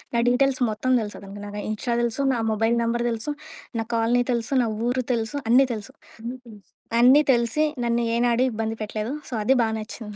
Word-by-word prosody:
నా 235 - +3
డీటెయిల్స్ 270 +1 +2
మొత్తం 255 +4 -1
తెలుసు 210 - -7
అతనికి. 200 +1 -9
నాకు 205 0 -6
ఇన్‌స్టా 235 +2 -2
తెలుసు, 235 +4 -1
నా - - -2
మొబైల్ 225 +2 +1
నంబర్ 235 +1 0
తెలుసు, 230 +6 -3 0.5
నా - - 0
కాలనీ 235 +2 +2
తెలుసు, 235 +2 -2
నా - - 0 0.2
ఊరు 255 +1 +1
తెలుసు, 225 -1 0 0.2
అన్నీ 250 +4 +6
తెలుసు. 210 -2 -7 0.3
అన్నీ 240 +2 -5
తెలుసు. 210 -3 -13 0.4
అన్నీ 260 +5 +7
తెలిసి, 235 +5 +2 0.2
నన్ను 235 0 +1
ఏనాడూ 240 +1 +2
ఇబ్బంది 225 0 -3
పెట్టలేదు. 215 +2 -4 0.2
సో, - - -8
అది 265 - +4
బాగా 220 0 -1
నచ్చింది 215 -1 -8
235 Hz, 190 wpm, -24 LUFS, 220-245 Hz, 0.5 s, అన్నీ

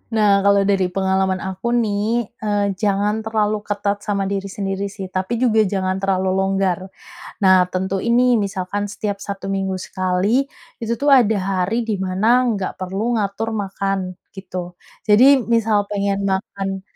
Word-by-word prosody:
Nah 205 -2 +4
kalau 200 0 +5
dari 195 -2 +2
pengalaman 190 0 0
aku 190 +4 -5 0.2
nih, 215 +2 -1
eee, 205 -1 +1 0.2
jangan 205 +1 +1
terlalu 215 -1 0
ketat 205 0 -1
sama 200 -1 0
diri 195 0 -2
sendiri 195 0 -3
sih, 195 -1 -7
tapi 190 +5 -2
juga 220 -3 +4
jangan 190 -1 -1
terlalu 190 -1 0
longgar, 195 -2 +1 0.6
nah 190 -1 +6
tentuin 190 +4 -2
nih 250 0 +4
misalkan 195 +1 -3
setiap 205 -2 -3
1 200 -1 -6
minggu 195 -1 -1
sekali 185 +1 -1 0.5
itu 230 0 -1
tuh 285 0 +2
ada 220 -3 +2
hari 185 +2 0
di 215 - +1
mana 185 +3 -1 0.2
nggak 200 -4 -2
perlu 190 +2 -3
ngatur 215 +1 -1
makan, 195 0 -2 0.4
gitu, 190 -1 -9 0.5
jadi 210 +4 +6 0.3
misal 220 -2 +2
pengen 200 -1 0
makan 195 0 -3
195 Hz, 150 wpm, -20 LUFS, 190-210 Hz, 0.6 s, nah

